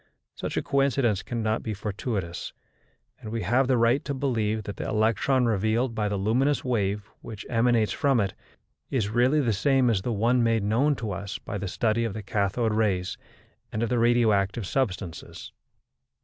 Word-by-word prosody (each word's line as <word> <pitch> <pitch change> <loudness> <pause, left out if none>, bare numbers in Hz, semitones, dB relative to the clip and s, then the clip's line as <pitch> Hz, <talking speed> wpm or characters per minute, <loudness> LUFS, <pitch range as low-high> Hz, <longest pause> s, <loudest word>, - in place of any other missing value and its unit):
Such - - -5
a - - 0
coincidence 135 -7 +1
cannot 110 -2 -2
be 110 -2 -4
fortuitous, 100 -3 -4 0.7
and 110 - -8
we 115 -1 -2
have 130 +2 +2
the 130 -1 +3
right 115 +4 +3
to 140 - -3
believe 110 -5 -1
that 100 - -7
the - - -4
electron 115 +4 +2
revealed 115 +3 +1
by 105 -2 -1
the 100 - -1
luminous 125 +9 +1
wave 105 -4 -1
which 110 -3 -8
emanates 115 -2 +2
from 140 -5 +2
it, 100 -3 0 0.6
is 110 -6 0
really 125 +7 +3
the 120 -5 +1
same 130 +3 +3
as 100 -4 +1
the 120 - -2
one 115 +3 +2
made 115 -2 +2
known 125 +8 +2
to 110 -5 -4
us 100 +2 -5
by 105 - -6
the 100 - -4
study 115 +4 0
of 115 -4 -3
the 110 - -5
cathode 105 +3 0
rays 95 -4 0 0.6
and 110 - -2
of 115 - -1
the 125 - +1
radioactive 115 -3 +2
substances. 95 -7 -3
110 Hz, 175 wpm, -26 LUFS, 105-125 Hz, 0.7 s, the